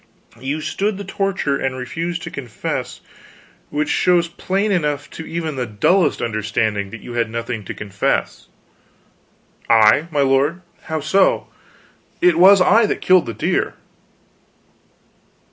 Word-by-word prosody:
You 140 +4 -3
stood 200 +6 -2
the 200 - -6
torture 195 -7 -1
and 135 -1 -2
refused 165 +7 -4
to - - -6
confess; 125 -6 -5 0.7
which 150 0 -2
shows 175 -2 +2
plain 195 +4 -2
enough 150 -6 -1
to 160 - -8
even 160 -4 -4
the 125 -1 -2
dullest 170 - +1
understanding 105 -2 -1
that 115 +2 -10
you 120 - -9
had 120 -2 0
nothing 115 -1 -4
to - - -6
confess 100 -2 -2 0.6
" - - -35
"I, 110 +7 +5
my 150 -3 0
lord? 140 +6 +1 0.2
How 160 -1 -3
so? 190 +7 +2 0.7
It 175 -2 +3
was 190 +1 +7
I 215 +4 +5
that - - -2
killed 185 -6 +4
the 115 - -4
deer!" - - -1
150 Hz, 140 wpm, -19 LUFS, 120-180 Hz, 0.7 s, was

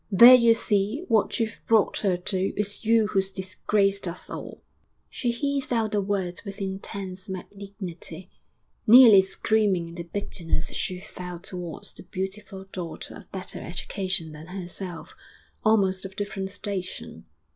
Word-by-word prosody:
There 235 +6 +10
you 235 -2 +7
see 215 - 0
what 225 +1 +2
you've 225 -2 -2
brought 220 -3 +3
her 190 -4 +1
to; 185 +1 -1
it's 205 +1 -2
you 225 0 +4
who's 195 -2 0
disgraced 195 +1 0
us 170 +1 -6
all!' - - -8 0.5
She 245 - -2
hissed 275 +3 -1
out 225 -3 +1
the 205 - +1
words 190 -3 -2
with 200 -1 -8
intense 190 -1 -5
malignity, 190 -2 -8 0.6
nearly 225 -4 +10
screaming 195 -2 +1
in - - -10
the 170 - -6
bitterness 170 -2 -3
she 185 -1 -2
felt 180 -3 -8
towards 180 -4 -7
the - - -10
beautiful 190 +1 -6
daughter 170 -3 -6
of 205 - -14
better 190 -1 -5
education 185 -1 -3
than 155 +2 -10
herself, 180 -1 -6 0.5
almost 195 -4 +3
of 195 0 -8
different 195 -1 -3
station. 200 -2 -5
195 Hz, 145 wpm, -26 LUFS, 185-210 Hz, 0.6 s, There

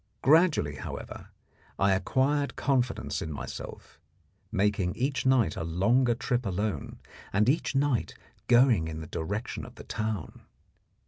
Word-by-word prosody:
Gradually, 150 - +4
however, - - -7 0.5
I 100 +1 +3
acquired 140 +8 +1
confidence 130 -3 0
in 80 - -4
myself, 70 - -8 0.5
making 95 -2 +1
each 130 +1 -1
night 125 -11 +3
a - - -3
longer 115 +9 +2
trip 125 0 -1
alone, 100 +1 -3 0.3
and 105 +3 +2
each 145 +1 +1
night 135 -3 +1 0.3
going 120 -8 +5
in 80 0 -5
the - - -6
direction 100 +9 -4
of - - -11
the - - -10
town. 110 -5 -4
110 Hz, 130 wpm, -28 LUFS, 95-130 Hz, 0.5 s, going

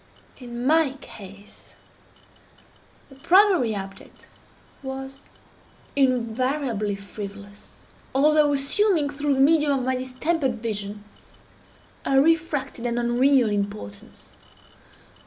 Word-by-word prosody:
In 240 -1 -6
my 310 -1 +3
case, 200 -4 -13 1.3
the - - -15
primary 345 - +3
object 195 0 -9 0.5
was 270 0 -7 0.8
invariably 255 -4 0
frivolous, 200 0 -9 0.5
although 300 +1 +4
assuming, 290 +2 +1
through 285 0 0
the - - -2
medium 295 +1 +4
of 255 - -3
my 260 0 +1
distempered 260 +2 -1
vision, 210 -2 -4 1.0
a 270 0 +3
refracted 305 -5 0
and 235 0 -2
unreal 240 0 +3
importance. 200 - -5
260 Hz, 90 wpm, -24 LUFS, 215-285 Hz, 1.3 s, although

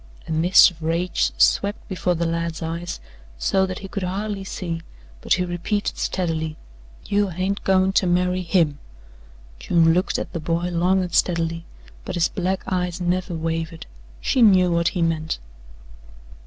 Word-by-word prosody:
A - - -6
mist 170 +4 +6
of 165 -1 -18
rage 165 - 0
swept - - +2
before 180 -2 -1
the 170 +1 -1
lad's 165 0 -2
eyes 170 +2 -4 0.4
so 190 - +1
that 185 0 -5
he - - -5
could 200 +1 -5
hardly 195 +2 -3
see, 170 -3 -4 0.4
but - - +2
he 180 0 +1
repeated 175 +4 -2
steadily: 160 -4 -2 0.5
"You 205 0 +1
hain't 185 +3 -2
goin' 190 0 +3
to 190 - +3
marry 180 +1 +1
HIM." 165 -5 +1 0.8
June 165 -2 +3
looked 180 +2 +1
at - - -5
the 170 - -3
boy 170 +2 -1
long 180 +2 +2
and 180 - -6
steadily, 165 -1 +1 0.4
but - - -5
his 175 - +2
black 185 +1 -2
eyes 180 -1 -2
never 180 0 -1
wavered 165 0 -3 0.3
she 255 - +1
knew 185 -5 +6
what 170 0 +2
he 175 -2 0
meant. 160 -1 -1
175 Hz, 160 wpm, -22 LUFS, 165-185 Hz, 0.8 s, mist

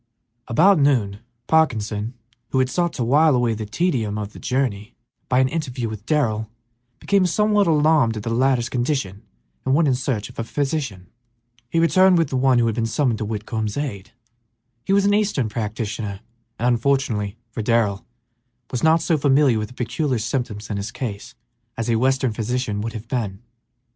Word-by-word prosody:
About 175 +9 +4
noon 120 -9 +2 0.3
Parkinson, 115 -7 +1 0.3
who - - -1
had 130 0 +2
sought 175 -1 0
to 125 - -2
while 145 +4 +4
away 120 -2 +1
the 110 -1 -5
tedium 115 - -1
of 105 0 -5
the - - -11
journey 120 -4 -2 0.3
by 125 - +2
an 130 0 +4
interview 130 -6 -3
with 110 0 -8
Darrell, 110 -8 0 0.5
became 195 -2 +2
somewhat 210 +2 +2
alarmed 150 -7 +3
at 105 - -5
the 115 - -3
latter's 125 -1 +2
condition 120 -6 -2 0.4
and 130 - +2
went 160 0 +3
in 135 - +3
search 125 -4 -2
of - - -12
a - - 0
physician. 135 - -3 0.6
He 165 - -2
returned 185 +2 +5
with 165 - +1
the - - -3
one 130 -1 +3
who 120 - +3
had 115 - +1
been 115 0 -1
summoned 120 0 0
to 110 - -2
Whitcomb's 110 +1 -3
aid. 105 -10 -4 0.7
He - - -3
was 200 0 +4
an 205 - +3
eastern 205 - +1
practitioner, 105 -2 -4 0.4
and, 120 - 0
unfortunately 115 -4 0
for 115 - -4
Darrell, 105 -3 +1 0.7
was 125 - -2
not 160 +1 +4
so 160 -3 +1
familiar 140 -4 +3
with 105 - -3
the 125 - -16
peculiar 130 +3 -1
symptoms 110 -2 -3
in 100 - -2
his 100 +2 -4
case 110 -5 -6 0.4
as 115 +1 -1
a - - +3
western 130 -1 +1
physician 115 -1 -2
would 115 +1 -4
have 110 +1 -8
been. 110 -5 -3
120 Hz, 180 wpm, -22 LUFS, 110-145 Hz, 0.7 s, returned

